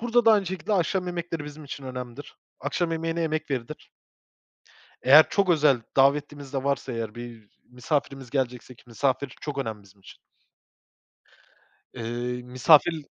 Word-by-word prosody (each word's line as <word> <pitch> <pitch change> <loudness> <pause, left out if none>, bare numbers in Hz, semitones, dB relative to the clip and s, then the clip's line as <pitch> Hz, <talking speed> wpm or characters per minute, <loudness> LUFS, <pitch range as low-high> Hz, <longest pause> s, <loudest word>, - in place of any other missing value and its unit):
Burada 240 0 +2
da 225 - +7
aynı 200 -3 +2
şekilde 190 +3 -3
akşam 185 0 +1
yemekleri 170 -3 -4
bizim 150 +1 -10
için 140 -1 -8
önemlidir. 125 +1 -8 0.2
Akşam 170 -2 -1
yemeğine 165 +1 -2
emek 155 -1 -2
verilir. 135 +2 -5 1.1
Eğer 145 +5 +8
çok 195 -2 +1
özel 145 -7 +4
davetlimiz 140 0 +2
de 135 -1 -2
varsa 140 -2 -1
eğer 115 -2 -4
bir 120 -3 -10 0.2
misafirimiz 135 0 -3
gelecekse 125 -2 -3
ki 120 - -22
misafir 130 +3 -1
çok 145 -2 -5
önemli 110 -5 -4
bizim 100 0 -22
için. - - -15 1.8
Eee, 120 +2 -4
misafir 150 +5 +4
140 Hz, 140 wpm, -26 LUFS, 125-165 Hz, 1.8 s, Eğer